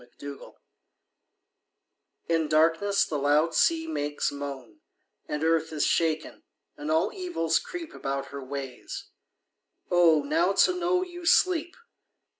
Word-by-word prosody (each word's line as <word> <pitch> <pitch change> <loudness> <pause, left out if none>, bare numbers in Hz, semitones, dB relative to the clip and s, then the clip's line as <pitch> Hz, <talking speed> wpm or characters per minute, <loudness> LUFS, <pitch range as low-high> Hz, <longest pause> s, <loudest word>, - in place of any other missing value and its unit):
The 120 0 -22
Charm 140 - -12 1.7
In 165 -2 +1
darkness 165 +6 +3
the 150 - -3
loud 150 +4 +2
sea 325 - +2
makes 145 - -2
moan; 140 -6 -7 0.5
And 150 +1 -3
earth 160 0 +1
is 150 -2 0
shaken, 160 -2 0 0.3
and 145 +1 -6
all 160 +6 +1
evils 345 - 0
creep 345 -3 -8
About 135 0 -4
her 140 -1 -7
ways. 135 -1 -7 0.8
Oh, 165 -4 +5
now 165 +6 +1
to 360 - +4
know 360 +1 +1
you 350 -2 -8
sleep! 355 -2 +3
160 Hz, 125 wpm, -27 LUFS, -, 1.7 s, Oh